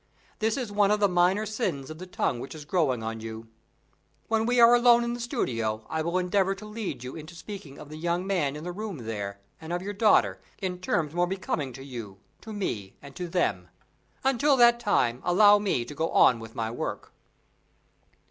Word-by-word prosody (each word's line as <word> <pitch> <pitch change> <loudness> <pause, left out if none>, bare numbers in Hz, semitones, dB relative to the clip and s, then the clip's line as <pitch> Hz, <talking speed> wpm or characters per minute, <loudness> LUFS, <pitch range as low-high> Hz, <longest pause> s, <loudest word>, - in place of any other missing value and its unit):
This 220 +2 +1
is 245 -6 -3
one 205 -1 +3
of 210 0 +2
the 205 - +4
minor 180 +3 +2
sins 180 - -3
of 155 - -9
the 185 - -8
tongue 125 -8 -1
which 135 - -7
is 150 -2 -9
growing 145 -9 +1
on 115 0 -4
you. 110 0 -7 0.8
When 225 0 +1
we 245 0 +2
are 235 0 +8
alone 240 0 +6
in 235 0 -2
the 240 - -5
studio, 115 - -2
I 160 - 0
will 170 +3 -1
endeavor 190 +1 +1
to 195 - -11
lead 210 - -5
you 125 - -7
into 160 +2 -9
speaking 170 -6 -9
of 145 - -11
the 155 - -8
young 170 +3 -1
man 170 -8 0
in 150 - -7
the 180 - -4
room 205 -1 -5
there, 100 -3 -4 0.2
and 160 +1 -7
of 175 +1 -2
your 205 +1 -4
daughter, 105 - +3 0.2
in 180 -2 -3
terms 165 -4 -1
more 175 +1 +1
becoming 165 -7 -3
to 135 - -9
you, 115 -8 -8 0.2
to 220 - -9
me, 110 - -4
and 140 -1 -13
to 180 - -4
them. 165 - 0 0.6
Until 270 +2 +3
that 240 -1 +6
time, 125 - +1
allow 205 +3 +6
me 195 -13 0
to 135 - -8
go 160 +3 -1
on 125 - +5
with 115 0 -10
my 110 -1 -2
work." 120 - -5
175 Hz, 210 wpm, -27 LUFS, 130-210 Hz, 0.8 s, are